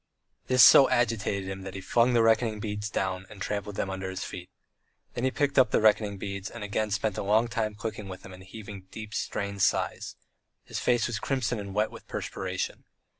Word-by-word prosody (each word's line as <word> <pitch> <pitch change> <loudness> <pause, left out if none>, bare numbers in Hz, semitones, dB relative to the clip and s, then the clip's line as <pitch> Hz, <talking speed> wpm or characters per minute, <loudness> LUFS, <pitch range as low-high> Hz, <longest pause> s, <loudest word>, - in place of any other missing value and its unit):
This 130 -1 +6
so 130 +2 +9
agitated 110 -6 0
him 95 0 -5
that 95 0 -7
he - - -4
flung 120 +6 +2
the 115 -1 +4
reckoning 110 -1 +2
beads 105 0 -3
down, 95 -2 -2
and 105 - -12
trampled 100 +1 -3
them 95 - -2
under 95 0 -4
his 95 -1 -4
feet. 90 0 -7 0.6
Then 120 - -2
he - - +3
picked 140 +1 +1
up 130 - +5
the - - +2
reckoning 105 -2 +3
beads, 100 0 -5
and 120 -3 -8
again 105 +1 -1
spent 100 0 -1
a - - -1
long 110 +4 +3
time 110 -2 -2
clicking 105 -2 -5
with 95 -1 -8
them 95 - -10
and 90 - -12
heaving 100 -1 -10
deep, 110 +1 -8
strained 100 -2 -3
sighs. - - 0 0.5
His - - -5
face 120 -2 +2
was 120 -3 -2
crimson 125 -4 -1
and 100 -1 -7
wet 105 +1 +1
with - - -12
perspiration. - - -4
105 Hz, 210 wpm, -28 LUFS, 95-115 Hz, 0.6 s, so